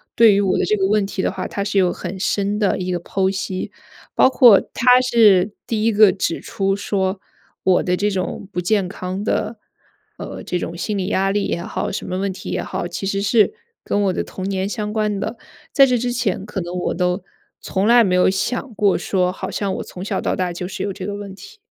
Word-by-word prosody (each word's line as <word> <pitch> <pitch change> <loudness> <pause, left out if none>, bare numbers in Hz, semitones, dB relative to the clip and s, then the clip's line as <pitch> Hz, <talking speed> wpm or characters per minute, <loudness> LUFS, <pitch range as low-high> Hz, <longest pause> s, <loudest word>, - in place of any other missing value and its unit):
对 225 -2 +7
于 200 - +3
我 195 -2 +1
的 - - +1
这 215 - +1
个 190 -1 +1
问 210 0 +2
题 195 -1 -3
的 - - +1
话， - - -5
他 200 - -3
是 205 -1 -1
有 185 -2 +4
很 185 +1 -6
深 200 +1 0
的 205 -3 +1
一 185 0 -2
个 175 - -1
剖 190 +2 0
析。 190 -1 -4 0.4
包 - - +6
括 240 -6 +7
他 250 +1 +5
是 215 -6 +4
第 220 -2 -1
一 230 - +3
个 210 -2 +6
指 185 -3 -2
出 195 -4 -1
说， 195 -1 -1 0.4
我 185 -1 +3
的 180 0 0
这 205 +2 +1
种 190 0 -3
不 180 - -3
健 195 +1 +1
康 185 +1 -5
的， 220 +1 -1 0.6
呃 - - -7
这 180 - -2
种 170 - -5
心 210 +3 -2
理 185 -1 -2
压 195 -1 +1
力 205 0 0
也 170 - -2
好， - - -3
什 195 - -4
么 185 - -3
问 195 0 -1
题 185 - -8
也 - - -1
好， 175 - -4
其 195 - -5
实 195 0 -1
是 215 - +3 0.3
跟 205 - 0
我 190 -2 +1
的 - - -2
童 185 - -8
年 190 0 -1
相 210 0 -3
关 210 -2 0
的。 225 +4 -4 0.3
在 275 - +6
这 250 -2 +1
之 245 +1 -1
前， 230 -6 -1
可 210 -2 -5
能 175 +1 -6
我 180 - -1
都 180 +1 -1 0.4
从 195 +2 -1
来 240 0 +7
没 190 -4 +1
有 180 - +4
想 235 +6 -2
过 200 -1 +3
说， 180 -2 0
好 190 0 -6
像 200 -2 -2
我 - - -4
从 180 - -9
小 - - -1
到 - - -1
大 180 -1 -1
就 175 +1 -5
是 190 - -5
有 200 - -2
这 185 -1 -7
个 200 +1 -4
问 205 -1 -7
题。 435 - -13
195 Hz, 255 characters per minute, -20 LUFS, 185-215 Hz, 0.6 s, 对